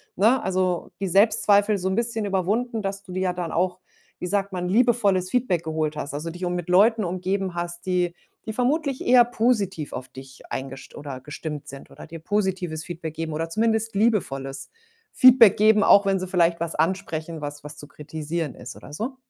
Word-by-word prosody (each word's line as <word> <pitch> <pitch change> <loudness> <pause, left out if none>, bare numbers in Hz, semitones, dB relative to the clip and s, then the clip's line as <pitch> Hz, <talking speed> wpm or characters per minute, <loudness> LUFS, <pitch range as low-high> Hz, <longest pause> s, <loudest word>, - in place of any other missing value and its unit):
ne, 225 +7 +3
also 185 -1 -1
die 195 - -2
Selbstzweifel 205 +1 +3
so 185 - -3
'n 190 - 0
bisschen 230 -2 -1
überwunden, 210 +5 -1
dass 195 0 -4
du 185 - -12
dir 185 +1 -3
ja 185 -1 0
dann 175 -2 -4
auch, 180 +1 0 0.4
wie - - -4
sagt 200 0 -1
man, 180 -1 -2
liebevolles 205 -4 +2
Feedback 190 -8 0
geholt 155 -1 -2
hast, 145 - -5
also 165 +3 -4
dich 180 +2 -5
um 180 0 -1
mit 175 -1 -4
Leuten 215 +4 +4
umgeben 185 +1 -2
hast, 175 0 -5
die 180 -2 0 0.3
die 220 - -3
vermutlich 275 +3 -1
eher 245 -1 +7
positiv 220 -9 -1
auf 130 0 -6
dich 130 0 -13
eingest 135 0 -7
oder 140 -3 -7
gestimmt 150 +1 -7
sind 140 0 -11
oder - - -12
dir 165 - -8
positives 180 -3 -2
Feedback 165 -3 -6
geben 160 -1 -4
oder 165 +2 -3
zumindest 225 +2 0
liebevolles 145 - -1 0.4
Feedback 250 -5 +7
geben, 215 0 +5
auch 200 0 +6
wenn 195 -1 +2
sie 185 - -4
vielleicht 170 -2 +2
was 170 0 -3
ansprechen, 165 -1 -2
was 145 0 -6
was 150 0 -10
zu 145 - -11
kritisieren 155 0 -5
ist 125 - -9
oder - - -13
so? 240 - -4
185 Hz, 195 wpm, -24 LUFS, 160-210 Hz, 0.4 s, eher